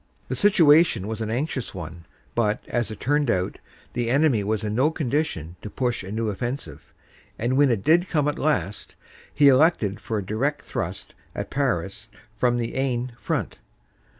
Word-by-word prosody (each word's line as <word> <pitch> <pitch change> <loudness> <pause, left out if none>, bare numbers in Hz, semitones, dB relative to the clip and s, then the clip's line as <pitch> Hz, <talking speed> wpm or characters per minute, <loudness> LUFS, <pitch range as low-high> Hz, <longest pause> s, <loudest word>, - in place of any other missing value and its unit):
The - - -1
situation 160 - +5
was 110 0 -4
an 110 - -2
anxious 130 -1 -3
one, 85 -1 -8 0.3
but, 110 -3 0
as 120 -2 -1
it 110 - -7
turned 145 -1 +1
out, 90 -4 0 0.3
the 120 -1 -1
enemy 135 -5 +3
was 110 +1 -1
in 105 -1 -2
no 130 +7 +3
condition 140 - -2
to 105 - -7
push 120 -1 -2
a 95 - -7
new 110 +1 -1
offensive 120 +7 -5 0.5
and 120 +3 0
when 140 0 +5
it 110 -5 0
did 175 +3 +4
come 150 -3 +1
at 150 - -1
last 105 - -1 0.4
he 145 - +4
elected 130 - +4
for 110 - -3
a 100 - -3
direct 135 +9 -1
thrust - - -5 0.2
at - - -5
Paris 105 -5 -2 0.3
from 120 -1 +2
the 115 -1 -3
Aisne 125 -2 -1
front. - - -3
120 Hz, 175 wpm, -24 LUFS, 105-145 Hz, 0.5 s, situation